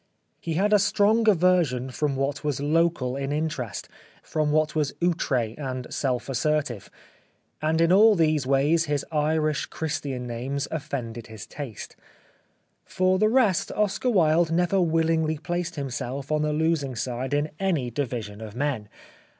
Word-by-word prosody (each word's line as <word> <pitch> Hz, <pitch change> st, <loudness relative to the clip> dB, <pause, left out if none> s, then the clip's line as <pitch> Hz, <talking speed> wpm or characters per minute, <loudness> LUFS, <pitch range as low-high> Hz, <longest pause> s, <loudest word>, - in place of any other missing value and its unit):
He 165 Hz, -1 st, -3 dB
had 205 Hz, +5 st, +2 dB
a 210 Hz, -, +6 dB
strong 210 Hz, +3 st, +3 dB
aversion 170 Hz, -9 st, +2 dB
from 145 Hz, +1 st, -1 dB
what 135 Hz, +3 st, -2 dB
was 145 Hz, -3 st, -1 dB
local 150 Hz, -3 st, +1 dB
in 140 Hz, 0 st, -3 dB
interest, 150 Hz, -7 st, -3 dB, 0.4 s
from 155 Hz, -2 st, -1 dB
what 155 Hz, 0 st, +2 dB
was 150 Hz, -3 st, -1 dB
outre 135 Hz, -10 st, 0 dB
and 130 Hz, -3 st, -5 dB
self 130 Hz, -3 st, -1 dB
assertive; 135 Hz, -4 st, -1 dB, 0.7 s
and 160 Hz, +1 st, +1 dB
in 165 Hz, +1 st, +4 dB
all 210 Hz, +3 st, +7 dB
these 155 Hz, -5 st, +2 dB
ways 145 Hz, +5 st, +3 dB
his 145 Hz, -2 st, -1 dB
Irish 155 Hz, -1 st, 0 dB
Christian 145 Hz, -6 st, -4 dB
names 130 Hz, +4 st, -3 dB
offended 125 Hz, -7 st, -5 dB
his 110 Hz, -1 st, -9 dB
taste. 130 Hz, -9 st, -8 dB, 0.9 s
For 185 Hz, 0 st, +1 dB
the 215 Hz, +1 st, +4 dB
rest 225 Hz, -7 st, +2 dB
Oscar 210 Hz, +4 st, 0 dB
Wilde 165 Hz, -5 st, +3 dB
never 175 Hz, +3 st, +2 dB
willingly 160 Hz, -1 st, +1 dB
placed 175 Hz, +2 st, -3 dB
himself 135 Hz, 0 st, -4 dB
on 150 Hz, 0 st, +2 dB
the 150 Hz, 0 st, 0 dB
losing 150 Hz, -4 st, 0 dB
side 125 Hz, +3 st, -3 dB
in 145 Hz, +1 st, -1 dB
any 165 Hz, -11 st, 0 dB
division 115 Hz, -5 st, -4 dB
of 110 Hz, -1 st, -8 dB
men. 125 Hz, -6 st, -2 dB
150 Hz, 150 wpm, -25 LUFS, 130-165 Hz, 0.9 s, all